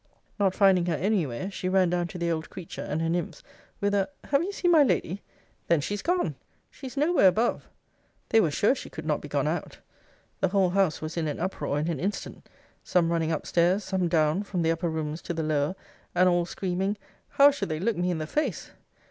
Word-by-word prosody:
'Not 195 -2 +2
finding 190 -3 +4
her 170 - +1
any 185 +1 +1
where, 130 +11 -5
she 185 -1 -3
ran 185 -2 +3
down 175 -1 0
to 180 - -8
the 170 -1 -1
old 160 -1 -3
creature, 185 -3 -8
and 155 +2 -2
her - - 0
nymphs, 170 -1 -3 0.4
with 205 0 0
a 195 -1 +1
Have 280 0 +2
you 370 +4 -2
seen 355 -3 +1
my 320 -3 +7
lady? 200 - +1 0.5
Then 170 -2 +3
she's 205 +8 -3
gone! 355 +1 0 0.4
She's 265 0 -9
no 305 +5 +2
where 195 - +6
above! 220 +6 +1 0.6
'They 225 - +5
were 165 - +2
sure 205 - +3
she - - -7
could - - -8
not - - 0
be - - -8
gone - - 0
out. - - -3 0.6
'The 190 - +2
whole 190 -1 +2
house 190 -5 +1
was 155 +2 -5
in 160 -2 0
an 150 - -3
uproar 155 -5 -2
in 150 +2 -1
an 165 -5 -2
instant; 200 +3 -4 0.3
some 170 -2 +2
running 165 -1 0
up 155 - -2
stairs, 180 +4 +2
some 190 -2 0
down, 160 +1 +2
from 190 -4 -2
the 165 - +3
upper 165 +1 -1
rooms 160 0 -3
to 170 - -4
the 160 - -1
lower; 155 +2 0 0.4
and 185 +1 +5
all 175 -1 +2
screaming, 190 +3 -2 0.3
How 280 +1 +6
should 280 -10 -4
they 155 0 -2
look 220 +5 0
me 180 +1 0
in 175 - 0
the 155 - -3
face! 300 - -2
180 Hz, 225 wpm, -27 LUFS, 165-200 Hz, 0.6 s, my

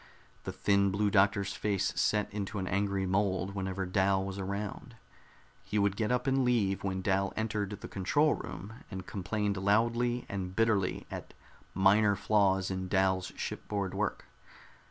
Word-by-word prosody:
The - - -3
thin 100 -1 +2
Blue 100 +1 +1
Doctor's 100 0 +3
face 100 -2 0
set 105 -1 +1
into 105 0 -4
an 95 -1 -2
angry 100 0 0
mold 95 0 0
whenever 95 -1 -3
Dal 95 +1 +2
was 95 0 -5
around. 100 +2 -5 0.7
He 105 - -3
would 100 -1 +2
get 110 +2 -1
up 125 0 +1
and 135 -1 +2
leave 110 -6 +1
when 95 -1 -2
Dal 95 0 +1
entered 105 -2 -1
the - - -6
control 145 +11 +2
room, 100 +5 -7 0.2
and 95 -3 -6
complained 100 +2 -2
loudly 120 +5 +1
and 95 -2 -4
bitterly 110 -4 +1
at - - -7 0.4
minor 100 +2 +4
flaws 95 -2 +2
in 95 0 -3
Dal's 95 -1 +1
shipboard 100 -3 -3
work. - - -2
100 Hz, 155 wpm, -31 LUFS, 95-105 Hz, 0.7 s, minor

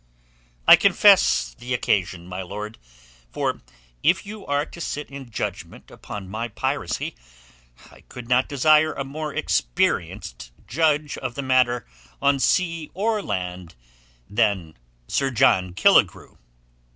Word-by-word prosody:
"I - - +10
confess 60 -2 +4
the 125 - -4
occasion, 95 -6 -1
my 90 +1 -6
lord. 105 +4 -7 0.5
For - - -2 0.4
if - - +2
you 210 0 -9
are 145 +1 0
to 170 - -11
sit 150 -3 -5
in 135 -3 -9
judgment 100 -6 -6
upon 100 -2 -8
my 110 +5 -4
piracy, 110 - -3 0.8
I - - -17
could 125 -2 -9
not 125 +1 +2
desire 155 +3 +4
a 135 - -4
more 150 +3 -5
experienced - - -1
judge 150 +1 0
of 125 -2 -5
the 140 - -4
matter 130 -2 +2 0.3
on 140 -1 +2
sea 165 +1 0
or 215 +2 0
land 90 - -5 0.5
than 100 -7 0 0.3
Sir 135 -1 0
John 95 -8 +2
Killigrew." - - +3
125 Hz, 125 wpm, -23 LUFS, 95-145 Hz, 0.8 s, I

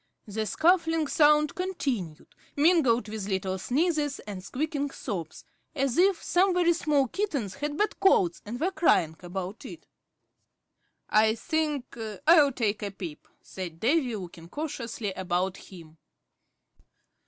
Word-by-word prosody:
The 215 +1 -3
scuffling 325 - +2
sound 300 0 +4
continued, 270 - -4 0.2
mingled 285 -8 +3
with 210 -2 -5
little 190 -1 -2
sneezes 295 - 0
and 195 -3 -8
squeaking 285 +5 -2
sobs, 180 - -6 0.3
as 270 -3 0
if 375 0 +3
some 365 +1 +2
very 345 -1 +4
small 295 -5 +1
kittens 280 - -2
had 295 0 -4
bad 420 - 0
colds 190 - +3
and 235 +4 -6
were 355 +5 0
crying 165 - +2
about 185 +3 -6
it. - - -10 1.2
"I 220 +1 +4
think 300 0 -2 0.3
I'll 305 -3 +7
take 220 -5 -1
a 205 - -2
peep," 180 -6 -8 0.2
said 175 -4 -7
Davy, 255 - +1
looking 175 -4 -9
cautiously 235 - -4
about 185 0 -1
him. 165 -4 -14
250 Hz, 130 wpm, -27 LUFS, 190-315 Hz, 1.2 s, I'll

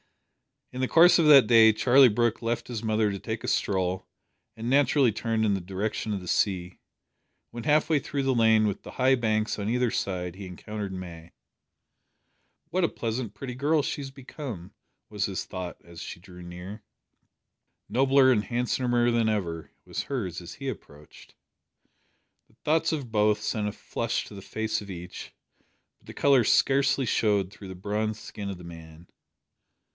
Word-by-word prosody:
In 125 - -7
the 130 - +1
course 170 +4 +6
of 160 - +4
that 140 -5 +9
day 110 -1 +6
Charlie 130 +4 +6
Brooke 120 +1 0
left 115 +1 -2
his 115 -3 -4
mother 110 -2 +1
to 100 - -5
take 110 +1 -5
a - - -4
stroll, 95 -1 -1 0.5
and 115 +1 -6
naturally 135 -1 +3
turned 110 +1 -1
in 105 - +2
the 95 - -2
direction 100 +4 -3
of 100 - -3
the 90 - -7
sea. 90 -3 0 0.7
When 120 -1 -7
half 150 0 +3
way 155 -3 +3
through 140 +1 -3
the 135 0 +2
lane 110 -2 +4
with 100 -2 -2
the - - -10
high 130 +1 +3
banks 110 -3 -1
on 100 +1 -2
either 125 0 +1
side 90 -2 -3
he 95 0 -8
encountered 100 +2 -6
May. 85 -3 -9 1.4
"What 180 +2 +1
a - - 0
pleasant 115 -2 -4
pretty 125 +4 -6
girl 145 +4 +1
she 145 - -3
has 135 - -6
become!" 135 - -8 0.4
was 105 -2 -1
his 95 -2 -4
thought 90 -2 -6
as 85 -1 -12
she 85 - -8
drew 90 -1 -13
near. 90 +5 -9 1.1
"Nobler 135 0 +4
and 110 -4 +1
handsomer 120 0 +1
than 115 -1 +2
ever!" 85 -7 -3 0.2
was - - -4
hers 95 - -4
as 85 - -10
he 135 -1 -5
approached. 75 - -12 1.1
The - - -29
thoughts 160 +2 +2
of 135 -7 -4
both 105 -1 +2
sent 105 0 -2
a - - -2
flush 115 +1 -3
to - - -12
the 100 - -9
face 110 +2 -3
of 100 - -11
each, 90 -1 -8 0.7
but - - -26
the - - -9
colour 135 -5 +4
scarcely 135 +2 +3
showed 105 -4 +1
through 100 - -11
the 95 - -8
bronzed 105 +3 -3
skin 100 -1 -7
of 95 - -5
the 90 - -12
man. 80 0 -12
110 Hz, 180 wpm, -27 LUFS, 95-125 Hz, 1.4 s, that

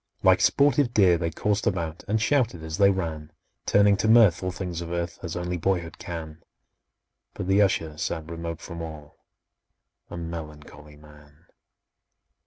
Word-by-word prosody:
Like 95 -1 +5
sportive 140 -1 +3
deer 90 -5 +5
they 85 - -1
coursed 105 +5 -1
about, 80 0 -2
And 110 +2 +1
shouted 115 - +1
as 80 +3 -5
they 100 -1 +6
ran,— 80 -5 -3 0.4
Turning 100 0 +5
to 105 - 0
mirth 110 -6 +6
all 95 - -2
things 90 -2 -5
of 85 - -6
earth, 85 0 -4
As 85 -3 -5
only 90 0 -3
boyhood 85 -1 -2
can; 80 -3 -7 0.9
But - - -4
the 95 +2 +4
Usher 80 -6 0
sat 80 -1 -3
remote 85 -1 -6
from 85 -1 -8
all, 75 -3 -10 0.8
A - - -7
melancholy 75 -3 -9
man! 75 +1 -19
85 Hz, 155 wpm, -25 LUFS, 80-95 Hz, 0.9 s, they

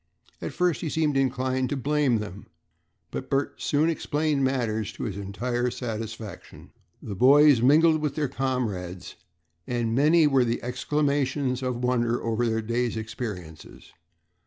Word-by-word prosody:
At - - -4
first 180 -3 0
he 160 - -2
seemed 150 -2 0
inclined 130 -1 0
to 145 - -2
blame 140 -2 +1
them, 105 -2 -7 0.6
but - - -5
Bert 140 +1 -1
soon 150 +2 +2
explained 155 -3 0
matters 115 -6 -1
to - - -7
his 105 -5 -3
entire 120 +5 -2
satisfaction. 110 -4 -7 0.3
The 105 - -5
boys 140 +4 +6
mingled 155 +4 +5
with 150 -2 -2
their 150 -2 0
comrades, 110 -10 -3 0.5
and 120 -2 -1
many 155 +5 +4
were 135 -3 +4
the 120 -1 -2
exclamations 135 0 0
of 125 -1 -3
wonder 120 -1 +1
over 115 +1 0
their 110 0 -1
day's 115 +1 -1
experiences. 105 -8 -7
125 Hz, 140 wpm, -26 LUFS, 115-145 Hz, 0.6 s, boys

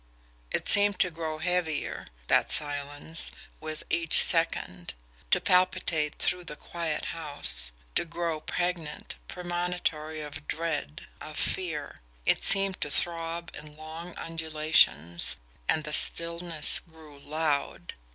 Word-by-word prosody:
It - - -3
seemed 205 -1 +7
to 180 - +2
grow 160 -1 -5
heavier, 170 -2 -3 0.2
that - - +2
silence, 145 +2 +1 0.3
with 155 0 -7
each 165 -1 +6
second 90 - -1 0.3
to - - +4
palpitate 175 -4 +1
through 180 0 -2
the 150 - -7
quiet 165 -1 -5
house 145 - +1 0.2
to - - 0
grow 170 -1 -4
pregnant, 175 -4 -4
premonitory 175 -3 -4
of 150 0 -9
dread, 160 -1 -4 0.2
of 155 0 -9
fear 160 -6 -4 0.3
it - - +1
seemed 195 -1 +6
to 145 - -2
throb 165 +2 -3
in 150 0 -11
long 160 +3 -10
undulations, 155 - 0 0.3
and 155 - +1
the 150 0 -5
stillness 170 -2 +5
grew 160 -4 -17
LOUD. 150 0 -3
160 Hz, 120 wpm, -27 LUFS, 150-170 Hz, 0.3 s, seemed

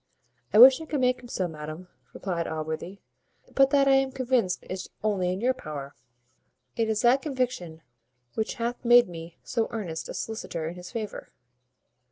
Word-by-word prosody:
"I - - +3
wish 260 +5 +9
I - - -6
could 295 - -1
make 250 0 +2
him 245 - -11
so, 185 -6 -2
madam," 155 +2 -8 0.2
replied 175 -4 -3
Allworthy; 160 +5 -5 0.5
"but 270 0 +5
that 275 0 +4
I - - +5
am 270 0 +3
convinced 255 -7 0
is 185 0 -5
only 190 -4 +1
in 185 +2 -3
your 255 +2 +3
power. 145 - -7 0.8
It 225 -1 0
is 215 +1 0
that 250 +3 +5
conviction 250 - -3 0.5
which 220 - -2
hath 240 +1 -3
made 240 0 +7
me 165 -1 -9
so 230 -3 -1
earnest 190 -9 -5
a - - -6
solicitor 175 -7 -4
in 165 - -4
his 180 0 -10
favour." 215 -3 -5
215 Hz, 175 wpm, -27 LUFS, 170-255 Hz, 0.8 s, wish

